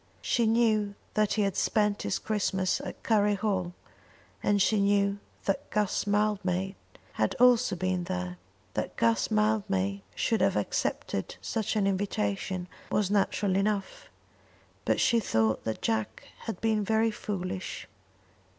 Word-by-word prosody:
She 235 -2 +2
knew 220 -3 +2 0.2
that 215 -1 +2
he 210 0 +2
had 195 -2 0
spent 210 -1 +1
his - - -1
Christmas 190 -3 0
at - - -8
Curry 210 -2 +3
Hall, 190 -4 -1 0.7
and 205 0 +2
she 210 +2 +3
knew 200 0 +2 0.3
that 195 - -1
Guss 210 -1 0
Mildmay 195 -2 0 0.5
had - - +2
also 250 -4 +4
been 185 0 -1
there. 90 - -4 0.3
That - - -3
Guss 115 0 +2
Mildmay 100 -2 +1
should 225 - +1
have - - +3
accepted - - -2
such 220 -1 -2
an 210 -2 +2
invitation 185 - -1 0.2
was 205 -2 +1
natural 200 -1 +1
enough, 205 - -1 0.8
but - - +2
she 235 - +4
thought 110 - +1
that 110 -1 -3
Jack 110 -1 -1 0.2
had 225 - -4
been 220 -2 +2
very 220 +2 +2
foolish. 185 -3 -4
200 Hz, 135 wpm, -29 LUFS, 180-215 Hz, 0.8 s, also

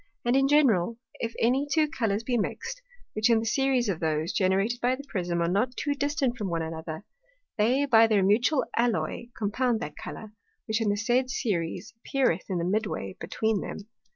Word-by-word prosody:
And 240 +2 +3
in 270 0 +4
general, 230 -8 +3 0.2
if 230 0 -3
any 260 +5 +2
two 310 +1 +3
Colours 225 -9 -1
be 245 +1 -1
mix'd, 470 - -3 0.3
which 215 +2 +2
in 230 - +5
the 220 - -1
Series 260 0 +1
of 185 -5 -1
those, 160 +1 -1
generated 195 +5 +1
by 250 +1 +2
the 280 - -9
Prism, 175 -5 -1
are - - +1
not 215 +8 0
too 290 - -1
far 285 - -3
distant 285 -2 +1
one 205 -3 -2
from - - -3
another, 160 +2 -6 0.5
they 255 +7 +3
by 225 -4 +6
their 210 -3 +3
mutual 240 +9 +3
Alloy 235 0 0
compound 230 +3 0
that - - -5
Colour, 215 -1 -8 0.3
which 220 +1 -1
in 220 - +1
the 205 - +1
said 245 +4 +1
Series 215 -1 -2
appeareth 225 -8 0
in 185 - -1
the 170 - -1
mid 210 +4 0
way 95 - -5
between 215 +4 -1
them. - - -5
225 Hz, 200 wpm, -27 LUFS, 195-255 Hz, 0.5 s, by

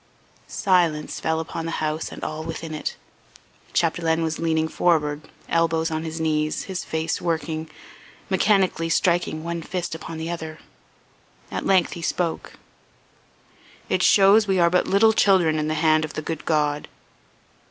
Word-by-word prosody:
Silence 170 -6 +1
fell 160 0 0
upon 165 0 -5
the 165 - -3
house 155 0 -2
and - - -9
all 155 +1 -4
within 160 0 -6
it. 155 - -4 0.8
Chapdelaine 165 -1 +1
was 160 -1 -2
leaning 160 -1 +1
forward, 150 -3 +1 0.3
elbows 165 0 +1
on 155 0 -2
his 160 0 -5
knees, 155 -1 0
his 190 -2 -5
face 160 0 -2
working, 160 -2 -2 0.6
mechanically 190 -3 +2
striking 170 -2 +1
one 170 0 -3
fist 175 +1 -4
upon 160 0 -7
the 160 +1 -4
other. 160 -2 -6 0.9
At - - -3
length 190 -3 +3
he 170 - -7
spoke: 165 0 -2 1.4
"It - - +1
shows 205 +2 +6
we 190 -1 +2
are 170 -1 +4
but 180 - +2
little 220 +3 +4
children 180 -7 +3
in 150 - -1
the 155 - -1
hand 155 0 +3
of 155 - -5
the 155 - -4
good 160 -1 -5
God. 150 -2 0
165 Hz, 150 wpm, -23 LUFS, 155-175 Hz, 1.4 s, shows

